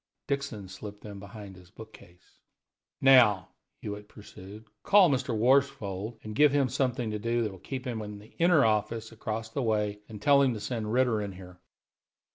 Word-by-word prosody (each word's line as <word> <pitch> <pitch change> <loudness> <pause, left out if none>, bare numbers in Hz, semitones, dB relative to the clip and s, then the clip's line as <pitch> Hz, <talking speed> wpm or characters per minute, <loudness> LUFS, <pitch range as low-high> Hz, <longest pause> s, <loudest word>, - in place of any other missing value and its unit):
Dixon 140 -8 -3
slipped 100 +2 -10
them 100 -2 -9
behind 100 -1 -10
his 90 -1 -17
book 110 +4 -13
case. 90 -3 -19 0.6
"Now," 115 -8 +5 0.3
Hewitt 105 0 -7
pursued, 105 +1 -12 0.2
"call 195 - +5
Mr. 125 -4 -1
Worsfold 115 -4 +1
and 110 - -7
give 150 +4 +5
him 140 -2 +2
something 125 -2 -1
to 105 - -3
do 115 +2 0
that 110 - -2
will 95 - -12
keep 130 +7 -6
him 120 -3 -3
in 105 -1 -7
the 105 +2 -16
inner 170 -5 +5
office 110 +1 -1
across 110 0 -5
the 135 - -3
way, 105 -3 0
and 105 -2 -9
tell 140 +6 +5
him 130 -4 +2
to - - -5
send 110 -1 -4
Ritter 120 -3 +2
here." 90 -1 -13
110 Hz, 180 wpm, -28 LUFS, 105-130 Hz, 0.6 s, Now